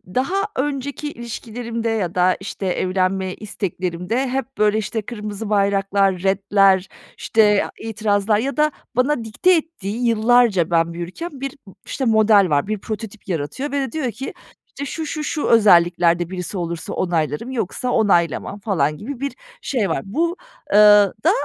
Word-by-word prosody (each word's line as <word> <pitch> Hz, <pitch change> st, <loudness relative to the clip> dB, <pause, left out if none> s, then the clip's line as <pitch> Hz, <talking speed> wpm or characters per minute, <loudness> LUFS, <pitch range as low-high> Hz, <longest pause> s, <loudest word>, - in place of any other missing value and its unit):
daha 360 Hz, +10 st, +1 dB
önceki 285 Hz, +2 st, -3 dB
ilişkilerimde 230 Hz, 0 st, -5 dB
ya 200 Hz, -6 st, -2 dB
da 180 Hz, 0 st, +3 dB
işte 195 Hz, 0 st, -6 dB
evlenme 185 Hz, 0 st, 0 dB
isteklerimde 190 Hz, +3 st, -3 dB
hep, 270 Hz, +1 st, -4 dB
böyle, 210 Hz, 0 st, +3 dB
işte, 220 Hz, +1 st, -2 dB
kırmızı 210 Hz, -1 st, -6 dB
bayraklar, 195 Hz, -2 st, +1 dB
retler, 195 Hz, -1 st, +3 dB, 0.3 s
işte, 210 Hz, -2 st, +3 dB
itirazlar 215 Hz, -1 st, 0 dB
ya 275 Hz, +6 st, -3 dB
da 305 Hz, 0 st, +3 dB, 0.2 s
bana 255 Hz, 0 st, +1 dB
dikte 225 Hz, +12 st, +2 dB
ettiği, 245 Hz, -, -3 dB
yıllarca 225 Hz, -5 st, +3 dB
ben 165 Hz, 0 st, +2 dB
büyürken, 175 Hz, -, -6 dB
bir, 275 Hz, +2 st, -5 dB, 0.3 s
işte, 265 Hz, -, -3 dB
model 215 Hz, -4 st, +4 dB
var, 145 Hz, +4 st, +1 dB
bir 215 Hz, 0 st, -1 dB
prototip 215 Hz, 0 st, -7 dB
yaratıyor 180 Hz, -, -3 dB
ve 285 Hz, -, 0 dB
de 265 Hz, -3 st, -3 dB
diyor 265 Hz, -5 st, -2 dB
ki: 265 Hz, +6 st, -7 dB, 0.3 s
İşte, 285 Hz, -, -7 dB
"Şu, 320 Hz, +3 st, -4 dB
şu, 305 Hz, 0 st, -4 dB
şu 300 Hz, 0 st, -2 dB
özelliklerde 175 Hz, -5 st, +4 dB
birisi 180 Hz, +1 st, -5 dB
olursa 170 Hz, -2 st, -4 dB
onaylarım 165 Hz, -, -1 dB
yoksa 250 Hz, 0 st, -2 dB
onaylamam." 200 Hz, -2 st, +1 dB
falan 155 Hz, -8 st, 0 dB
gibi 245 Hz, -, -7 dB
bir 280 Hz, +1 st, -3 dB, 0.3 s
şey 230 Hz, -8 st, -1 dB
var. -, -, -1 dB
Bu 335 Hz, -, -1 dB, 0.3 s
eee, 205 Hz, -, +4 dB, 0.5 s
da -, -, +5 dB
210 Hz, 150 wpm, -20 LUFS, 185-250 Hz, 0.5 s, da